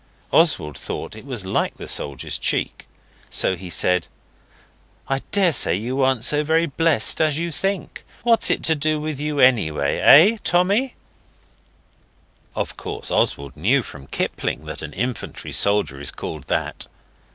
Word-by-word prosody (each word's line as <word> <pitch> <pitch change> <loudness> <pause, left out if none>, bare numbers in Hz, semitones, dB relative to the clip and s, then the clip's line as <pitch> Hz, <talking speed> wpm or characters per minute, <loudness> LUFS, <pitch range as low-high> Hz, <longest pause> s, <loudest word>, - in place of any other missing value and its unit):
Oswald 75 -2 +2
thought - - -6
it 110 +5 -12
was 120 -8 -3
like 95 - -2
the - - -9
soldier's 70 -2 -2
cheek, - - -1 0.4
so 95 - +1
he 90 0 -10
said 90 0 +2 1.0
'I 135 0 -1
daresay 175 - +3
you 125 +7 -3
aren't 130 -3 +1
so 150 +4 +4
very 160 +2 +2
blessed 160 -4 +3
as 155 -2 +2
you 170 +1 -3
think. 195 +4 -4 0.2
What's 230 -1 +3
it - - 0
to 160 - +3
do 155 0 -1
with 150 -2 -5
you, 150 0 -3
anyway, 90 - +2
eh, 190 +11 +7
Tommy?' 200 +9 +1 1.6
Of - - -4
course - - -5
Oswald 70 -1 -1
knew 120 - +1
from 70 -8 -12
Kipling 75 - -3
that 80 -1 -6
an 75 -2 -8
infantry 125 +5 -4
soldier 100 -9 +2
is 70 - -1
called 75 -4 -7
that. - - -3
130 Hz, 150 wpm, -21 LUFS, -, 1.6 s, eh